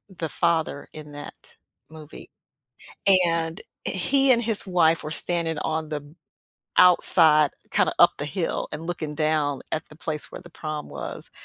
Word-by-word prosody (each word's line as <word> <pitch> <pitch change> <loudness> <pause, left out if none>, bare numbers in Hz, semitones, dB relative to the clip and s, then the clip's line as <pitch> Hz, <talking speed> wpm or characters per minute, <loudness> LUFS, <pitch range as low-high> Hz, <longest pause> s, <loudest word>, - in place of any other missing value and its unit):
the 170 -4 -5
father 165 -4 -1
in 150 -1 -10
that 145 0 -11 0.4
movie, 155 -1 -12 1.0
and 165 -1 -1 0.3
he 270 +9 +2
and 235 0 +2
his 220 -3 0
wife 165 -3 +3
were 155 - -5
standing 165 -3 -1
on 160 0 -2
the 150 -2 -3 0.8
outside, 160 -4 +6 0.2
kind - - +2
of - - -8
up - - +7
the - - -3
hill - - -2
and 165 +2 -6
looking 155 -4 -4
down 150 -2 0
at 155 - -1
the 155 - -14
place 155 -2 -5
where - - -7
the 175 - -14
prom 155 -1 -5
was, - - -7
160 Hz, 155 wpm, -24 LUFS, 155-175 Hz, 1.0 s, up